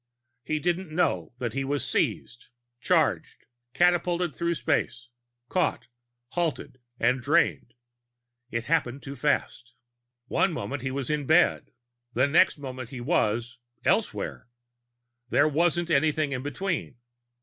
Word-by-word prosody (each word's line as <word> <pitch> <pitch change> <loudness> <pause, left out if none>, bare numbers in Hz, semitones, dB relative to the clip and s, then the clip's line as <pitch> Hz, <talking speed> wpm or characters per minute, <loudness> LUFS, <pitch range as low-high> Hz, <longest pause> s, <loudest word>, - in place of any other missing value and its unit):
He 155 - -1
didn't 175 +3 -1
know 120 - 0
that 120 -3 -3
he 135 - -1
was 140 +1 -2
seized, 120 +2 -1 0.3
charged, - - +1 0.3
catapulted 175 -2 +2
through 170 0 0
space, 125 -6 -1 0.4
caught, 180 +1 0 0.4
halted 165 -6 -2 0.2
and 125 +2 +2
drained. 140 -4 +1 0.7
It 115 -2 -2
happened 140 -3 0
too 140 0 -7
fast. 140 -4 -1 0.5
One 180 +7 +1
moment 145 -3 -4
he 135 - -2
was 135 +1 -3
in 150 - +1
his 140 - -7
bed; 165 +3 +3 0.5
the 130 +3 +4
next 155 +5 +4
moment 130 -4 -7
he 130 - -7
was 120 0 0 0.3
elsewhere. - - 0 0.8
There 145 - +4
wasn't 170 +3 +1
anything 155 0 +2
in 130 -2 -2
between. 145 -1 -3
145 Hz, 125 wpm, -27 LUFS, 125-170 Hz, 0.8 s, the